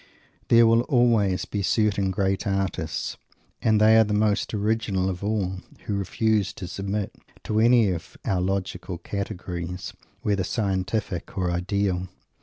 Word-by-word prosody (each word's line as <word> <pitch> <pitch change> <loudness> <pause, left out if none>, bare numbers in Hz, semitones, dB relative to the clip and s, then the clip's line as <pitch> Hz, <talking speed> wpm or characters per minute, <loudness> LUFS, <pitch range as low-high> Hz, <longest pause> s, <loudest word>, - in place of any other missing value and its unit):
There 115 0 +6
will 115 +1 +5
always 115 -7 +3
be 100 - -3
certain 100 0 +2
great 95 +1 0
artists, 95 -5 -2 0.4
and 110 -1 +3
they 110 +1 +6
are - - +7
the 105 -1 -1
most 105 -1 +1
original 105 -3 0
of 90 +1 -7
all 100 -3 -1 0.3
who 105 - -2
refuse 100 0 0
to 90 - -7
submit 100 +2 -3 0.3
to 110 0 0
any 115 -3 +5
of 85 -3 -6
our 95 -2 +1
logical 95 -1 -2
categories, 90 -2 -5 0.3
whether 100 -2 +1
scientific 95 -2 -2
or 90 -2 0
ideal. 90 +1 -1
100 Hz, 140 wpm, -25 LUFS, 95-110 Hz, 0.4 s, are